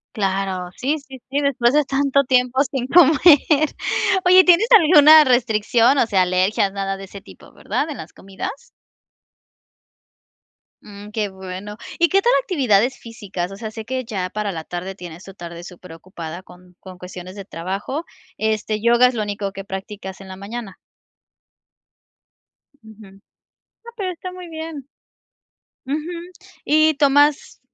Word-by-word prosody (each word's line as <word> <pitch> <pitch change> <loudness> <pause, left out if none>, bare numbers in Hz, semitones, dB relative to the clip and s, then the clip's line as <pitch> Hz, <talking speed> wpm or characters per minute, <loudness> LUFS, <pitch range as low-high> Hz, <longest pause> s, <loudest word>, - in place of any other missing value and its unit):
Claro, 190 -2 -2
sí, 280 +5 0
sí, 270 -1 -13
sí, 280 +2 -1
después 260 -3 +1
de 300 0 +4
tanto 280 0 +1
tiempo 250 +1 +2
sin 265 -2 -4
comer. 315 -2 +5 1.1
Oye, 370 +1 +7
¿tienes 365 +5 +5
alguna 310 -6 +8
restricción? 240 0 +2
O 240 - +2
sea, 195 -4 +2
alergias, 185 +2 +1
nada 195 -1 -3
de 195 - -10
ese 200 +1 -10
tipo, - - -17
¿verdad? 305 - -3
¿En 290 - -6
las 160 - -10
comidas? 395 - -8 2.2
Mm, 205 0 -12
¡qué 210 -2 -2
bueno! 190 +2 -8 0.2
Y, 340 - +4
¿qué 390 +1 +3
tal 485 - +3
actividades 255 - +1
físicas? 195 -5 -6
O - - -8
sea, 220 -1 -7
sé 220 -1 -8
que 260 +1 -3
ya 190 -5 -4
para 210 0 -3
la 160 -3 -6
tarde 180 +3 -6
tienes 175 -1 -10
tu 195 - -12
tarde 170 -2 -9
super 180 -1 -12
ocupada 170 0 -9
con 180 0 -18
con 185 -1 -12
cuestiones 180 +1 -10
de 200 -2 -9
trabajo. 195 - -5 0.3
Este, 215 -1 -2
¿yoga 240 +2 +5
es 250 - -2
lo 220 -3 -2
único 200 -1 -4
que 195 -1 -7
prácticas 195 0 -8
en 195 - -12
la 190 - -9
mañana? 200 +1 -8 2.1
Ujú. 220 0 -15
No, 195 +1 -24 0.6
pero 375 -4 -3
está 365 +1 -8
muy 365 -2 -10
bien. 315 -4 -8 1.0
Ujú. 290 +3 -1 0.7
Y, 310 +1 +3
¿tomas, 290 0 +2
215 Hz, 150 wpm, -20 LUFS, 190-280 Hz, 2.2 s, alguna